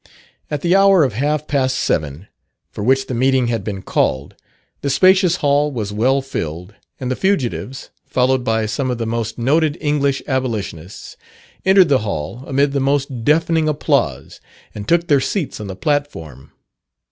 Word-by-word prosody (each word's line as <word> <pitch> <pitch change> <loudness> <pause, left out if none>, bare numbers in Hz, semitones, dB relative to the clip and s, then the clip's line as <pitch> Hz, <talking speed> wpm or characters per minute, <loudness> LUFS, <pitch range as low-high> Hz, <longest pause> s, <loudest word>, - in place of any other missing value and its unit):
At 150 -2 -3
the 175 +2 +2
hour 195 -3 +5
of 130 -5 0
half 150 +6 -1
past 130 -2 0
seven, 75 +4 -2 0.4
for - - -6
which 135 +3 +2
the 130 - -5
meeting 130 0 +2
had 115 -1 -2
been 100 -2 -5
called, 70 -5 -1 0.5
the 140 - -2
spacious 185 +5 +4
hall 145 -2 +1
was 105 -6 -4
well 130 +6 +1
filled, 90 - -5 0.3
and 130 -1 -3
the - - 0
fugitives, 135 - -2 0.2
followed 130 0 +1
by 110 -2 0
some 130 +5 -2
of 125 - -2
the 115 - -3
most 115 0 -3
noted 150 +5 +1
English 140 -2 0
Abolitionists, 110 - -4 0.5
entered 190 -3 +6
the 135 -2 +4
hall, 100 - -5
amid 140 +1 +1
the 140 - -1
most 135 -3 -1
deafening 160 +2 +2
applause, 150 - -1 0.3
and 100 -1 -8
took 170 0 +2
their 145 -4 +3
seats 165 - -3
on 105 - -6
the 95 - -6
platform. 80 - -3
130 Hz, 165 wpm, -18 LUFS, 110-145 Hz, 0.5 s, entered